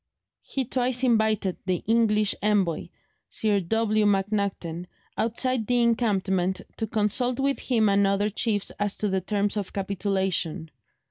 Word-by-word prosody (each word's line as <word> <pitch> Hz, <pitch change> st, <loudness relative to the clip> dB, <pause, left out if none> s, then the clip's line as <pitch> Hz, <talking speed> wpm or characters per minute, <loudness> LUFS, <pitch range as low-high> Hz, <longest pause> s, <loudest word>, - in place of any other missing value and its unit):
He 265 Hz, -1 st, -3 dB
twice 250 Hz, +1 st, 0 dB
invited 220 Hz, -6 st, +2 dB
the 185 Hz, -1 st, 0 dB
English 215 Hz, -2 st, +3 dB
envoy, 200 Hz, -5 st, +1 dB, 0.4 s
Sir 210 Hz, -2 st, +1 dB
W. 215 Hz, +3 st, +1 dB
MacNaghten, 195 Hz, -4 st, -1 dB, 0.3 s
outside 235 Hz, +1 st, -1 dB
the 245 Hz, -1 st, +3 dB
encampment 195 Hz, -6 st, +1 dB, 0.2 s
to 220 Hz, -, -2 dB
consult 230 Hz, +5 st, 0 dB
with 275 Hz, 0 st, +1 dB
him 225 Hz, -4 st, +2 dB
and 200 Hz, 0 st, +3 dB
other 200 Hz, +2 st, +1 dB
chiefs 210 Hz, -1 st, -1 dB
as 205 Hz, -1 st, -1 dB
to 210 Hz, -, -1 dB
the 190 Hz, 0 st, 0 dB
terms 205 Hz, +2 st, -1 dB
of 200 Hz, -3 st, -4 dB
capitulation. 190 Hz, -4 st, -1 dB
210 Hz, 135 wpm, -26 LUFS, 195-225 Hz, 0.4 s, English